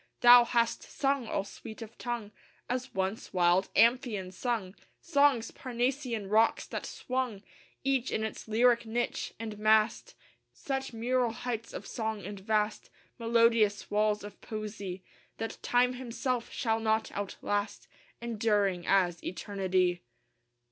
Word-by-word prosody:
Thou 245 0 +9
hast 235 -1 +1
sung, 275 -3 -1
all 195 - -1
sweet 220 +3 -9
of 225 +1 -12
tongue, 235 -4 -4 0.4
As 255 +1 -3
once 190 +3 -2
wild 180 +1 +3
Amphion 230 -5 +3
sung, 205 -2 -2 0.3
Songs, 285 -7 +3
Parnassian 245 -3 -2
rocks, 220 +3 +3
that - - -5
swung 255 -6 -3 0.4
Each 265 -2 +1
in 220 - -1
its 220 - -5
lyric 235 +1 +3
niche, 240 +2 -2
and 215 -2 -6
massed 215 +1 +2 0.4
Such 270 -1 -3
mural 240 +1 0
heights 230 -1 -4
of - - -7
song 220 -3 -3
and 200 0 -6
vast, 210 +1 -1 0.3
Melodious 230 -3 +3
walls 210 0 +2
of 205 - -10
poesy, 205 -4 -6 0.3
That 225 - -5
Time 245 +1 +3
himself 250 0 -3
shall 225 -2 0
not 220 0 0
outlast, 205 +1 -3 0.4
Enduring 205 -5 +1
as 180 -3 +2
eternity. 185 -1 0
225 Hz, 125 wpm, -30 LUFS, 205-245 Hz, 0.4 s, Thou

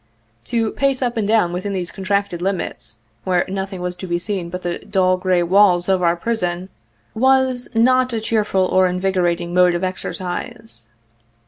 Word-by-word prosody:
To 225 -2 0
pace 275 -1 0
up 240 -1 -1
and 215 -3 -1
down 210 -6 +2
within 185 +3 -3
these 180 -3 -3
contracted 195 -2 -1
limits, 185 -10 -3 0.3
where 180 -2 +1
nothing 190 -1 -4
was 180 0 -3
to 185 - -7
be 175 0 0
seen 180 -1 -3
but 180 +1 -6
the 175 -1 -2
dull, 185 -3 +1
gray 180 -1 +1
walls 180 -1 +4
of 190 -1 +2
our 170 -1 +3
prison 180 -2 -2 0.4
was 260 +1 +2
not 255 +2 +3
a 230 - -1
cheerful 215 -4 +1
or 185 0 +3
invigorating 180 -2 0
mode 180 -1 +4
of 175 - -2
exercise. 185 - -5
190 Hz, 165 wpm, -20 LUFS, 180-220 Hz, 0.4 s, walls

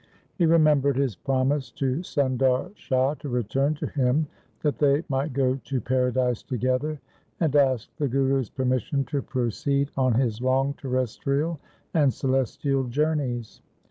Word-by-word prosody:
He 175 - +1
remem 155 -3 +5
bered 140 0 +1
his 135 -5 0
promise 135 - 0
to 135 -1 -1
Sundar 135 -1 +1
Shah 130 -5 +1
to 145 - -6
return 130 +5 0
to - - -4
him 135 +2 +1 0.4
that 150 -2 0
they 145 +1 +3
might 135 +2 -1
go 130 0 +1
to 135 -2 -1
paradise 125 0 0
together, 130 +5 -1 0.4
and 155 -4 +1
asked 130 -5 +2
the 145 - +1
Guru's 135 -1 +1
permission 130 +1 0
to 140 +3 -2
proceed 140 +3 -1
on 130 -3 +2
his 120 -2 0
long 135 +2 +2
terres 130 -5 -2
trial 150 +3 -1 0.3
and 145 -5 +4
celestial 135 +1 0
journeys. 130 -3 -1
135 Hz, 145 wpm, -25 LUFS, 130-145 Hz, 0.4 s, remem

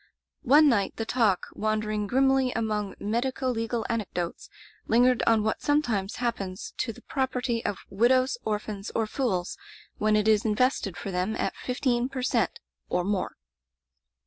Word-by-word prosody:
One 295 +4 +7
night 215 -8 +2
the 225 - -3
talk, 220 -6 +2
wandering 215 -1 -1
grimly 265 +2 +3
among 210 -3 -2
medico 255 +5 -1
legal 230 0 -2
anecdotes, 190 -7 -3 0.4
lingered 245 +1 +4
on 225 -2 +4
what 220 - -1
sometimes 240 -9 0
happens 200 -6 -3
to 230 - -1
the - - -15
property 250 -3 -1
of 205 - -3
widows, 255 - +3
orphans, 210 -1 -3
or 225 - +2
fools 215 -7 -2 0.4
when 215 0 +3
it 210 0 +2
is 215 -1 +4
invested 220 -3 +1
for 195 - -5
them 185 +4 -1
at - - -2
fifteen 250 -1 -1
per 265 -2 -4
cent, - - 0 0.3
or 180 - +1
more. 195 0 -1
225 Hz, 145 wpm, -27 LUFS, 210-250 Hz, 0.4 s, One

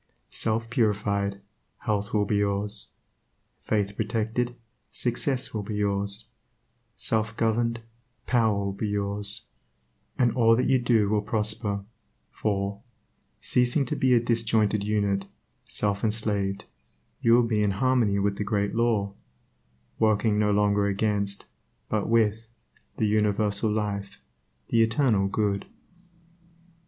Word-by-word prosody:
Self 115 +1 -1
purified, 100 -4 0 0.4
health 105 -2 -1
will 105 -1 +2
be 105 +1 0
yours; 100 +1 -1 0.7
faith 100 -2 -1
protected, 115 +3 -1 0.4
success 130 -2 -1
will 110 - -2
be 105 +1 -5
yours; 100 +1 0 0.7
self 110 0 -1
governed, 115 +1 +1 0.4
power 110 -4 +2
will 100 0 -1
be 105 +2 -3
yours, 100 0 -1 0.7
and 120 -2 +3
all 115 -1 +4
that 125 - +1
you 130 -1 +4
do 115 -4 +3
will 105 0 +1
prosper, 105 -1 -1 0.5
for, 100 -1 -2 0.6
ceasing 125 +3 +2
to - - -2
be 130 -2 +3
a - - +5
disjointed 115 -3 +1
unit, 100 -2 0 0.4
self 100 -1 -1
enslaved, 105 -3 -1 0.6
you 115 - +4
will 120 +1 +6
be 110 -2 +1
in 105 - +2
harmony 115 -1 +2
with 100 0 0
the - - -1
Great 100 -1 -1
Law, 115 -4 +1 0.9
working 110 -1 +2
no 105 0 +2
longer 100 0 +2
against, 100 0 -1 0.4
but 105 -1 -1
with, 115 0 +2 0.5
the - - +1
Universal 105 0 +1
Life, 100 -2 -3 0.5
the 115 - +3
Eternal 115 -3 +2
Good. 100 0 -1
105 Hz, 125 wpm, -26 LUFS, 100-115 Hz, 0.9 s, will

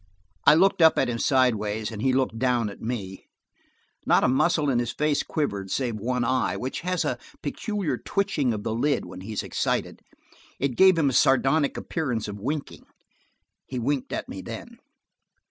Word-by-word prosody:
I - - +9
looked 185 +1 +3
up 160 0 +6
at - - +2
him 115 -1 -2
sideways, 110 -5 +1
and 105 -2 -6
he 130 +2 +2
looked 130 -3 0
down 120 -4 +1
at - - -13
me. 100 -5 -5 0.8
Not - - +3
a - - +4
muscle 150 +2 +2
of 120 - +2
his 120 - -1
face 150 -1 0
quivered, 100 -11 -3
save 120 0 -1
one 125 +3 -1
eye, 130 +2 0
which 130 +2 -4
has 180 0 -1
a - - -2 0.2
peculiar 205 -6 -2
twitching 195 -10 0
of 105 -2 -4
the 110 - -2
lid 140 +5 0
when 90 +1 -9
he 100 +4 -7
is 105 - -2
excited. - - -2 0.6
It 140 - +1
gave 190 +2 +6
him 145 -4 +3
a - - -5
sardonic 135 +4 +3
appearance 125 -10 -2
of 105 0 -6
winking. 140 +7 -5 0.8
He 130 - -5
winked 130 +3 -1
at - - -3
me - - -7
then. - - -9
130 Hz, 180 wpm, -25 LUFS, 110-150 Hz, 0.8 s, I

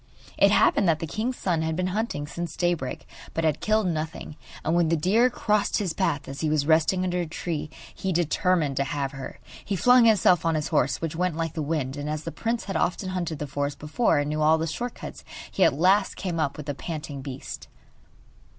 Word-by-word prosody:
It - - +5
happened 345 - +4
that 160 - +3
the 165 - -4
king's 225 - -3
son 170 -4 0
had 160 0 -1
been 185 +2 -1
hunting 210 -9 -2
since 170 +2 -6
daybreak, 175 -7 -1 0.3
but 165 - 0
had 155 -2 +1
killed 215 0 +2
nothing, 160 -2 -3 0.3
and 160 - +1
when 170 -2 +3
the 165 - +2
deer 210 +10 +3
crossed 210 -4 +1
his 190 -6 -1
path 145 -7 -1
as 135 +1 -6
he 155 - +1
was 150 -2 +1
resting 165 +4 +3
under 180 -1 0
a 170 - -3
tree 160 -1 -4 0.2
he 190 - -3
determined 170 -3 +1
to 140 - +2
have 140 -1 -2
her. 135 -2 -8 0.3
He 200 - -2
flung 245 +4 +6
himself 185 -6 +5
on 165 -1 +1
his 155 0 -1
horse, 140 -4 +1
which 165 -1 -3
went 180 -1 0
like 165 -1 -2
the 160 - -3
wind, 145 -3 -2
and 145 +1 -4
as 155 0 -3
the 165 - -5
prince 230 +5 -2
had 195 - -5
often 185 +1 -1
hunted 175 -4 -3
the 150 - -4
forest 140 0 -3
before, 155 +5 +1
and 145 0 0
knew 155 +1 -1
all 155 +1 +5
the 160 - -1
short 240 +10 -4
cuts, - - -9 0.3
he 190 - +2
at - - +6
last 190 +5 +3
came 175 -4 -3
up 150 -3 -1
with 150 - -7
the 145 - -2
panting 150 -2 -6
beast. 135 -1 -7
165 Hz, 225 wpm, -26 LUFS, 150-185 Hz, 0.3 s, flung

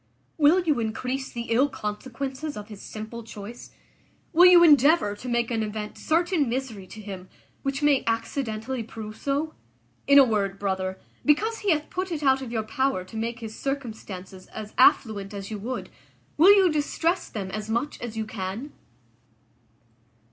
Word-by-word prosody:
Will 310 +5 +6
you 305 -7 +1
increase 250 +4 -3
the 235 -1 -6
ill 260 +5 +4
consequences 260 +7 -5
of 210 0 -8
his 210 -2 -10
simple 220 +2 -7
choice? 220 +1 -9 0.6
Will 350 +3 +8
you 355 -1 +8
endeavour 295 -7 +5
to 250 +4 -7
make 235 0 0
an 225 -1 0
event 210 0 -4
certain 330 -3 +1
misery 235 -6 -4
to 215 - -11
him, 190 -3 -8 0.3
which 275 +1 -2
may 290 -2 +4
accidentally 230 +1 -2
prove 215 -1 -8
so? 285 +5 -2 0.5
In 280 - +7
a 280 - +10
word, 200 -5 0
brother, 190 -1 -2 0.3
because 435 +10 +2
he 415 - -1
hath 305 -3 +1
put 370 0 -3
it 310 -3 -3
out 265 -1 +4
of 255 -3 -6
your 225 -2 -1
power 260 -2 0
to 185 - -14
make 230 +2 -3
his 220 -1 -7
circumstances 215 -9 -6
as 215 -1 -8
affluent 210 -5 +3
as 195 +1 -6
you 210 - -4
would, 250 +5 -5 0.4
will 345 +6 +8
you 385 -4 +6
distress 320 +4 0
them 195 -3 -5
as 215 +2 -5
much 235 +6 -2
as 230 -2 -6
you 220 - -1
can?" 215 +6 -5
235 Hz, 170 wpm, -26 LUFS, 215-285 Hz, 0.6 s, a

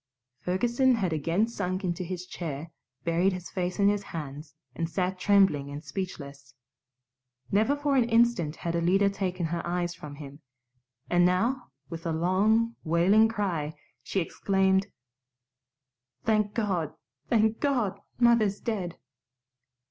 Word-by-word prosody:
Ferguson 240 - +2
had 190 -7 -1
again 165 +8 +1
sunk 190 -4 -3
into 180 0 -2
his 180 0 -5
chair, 160 -3 -6 0.3
buried 170 +3 +2
his 180 -1 -7
face 180 -1 -2
in 200 - +4
his 205 0 +2
hands, 150 -4 -7 0.2
and 165 -1 -3
sat 185 +1 -1
trembling 190 -8 +3
and 145 +2 -7
speechless. 140 -9 -7 1.0
Never 220 +8 +3
for 290 -1 0
an 245 -3 +3
instant 230 -9 +3
had 170 0 -3
Alida 190 +4 +3
taken 185 -3 -2
her 170 +1 -2
eyes 175 0 -1
from 145 -3 -9
him; 140 -1 -10 0.7
and 175 0 +3
now, 230 +9 +1 0.2
with 165 0 -5
a - - 0
long, 205 +8 +2
wailing 180 +7 +4
cry, 180 -9 -2 0.3
she 195 - -2
exclaimed, 190 +2 +1 1.4
"Thank 215 -2 +1
God, 185 -9 -1 0.3
thank 220 -1 +3
God! 240 -9 0 0.2
Mother's 235 -4 +4
dead." 195 -7 -3
185 Hz, 135 wpm, -28 LUFS, 170-215 Hz, 1.4 s, in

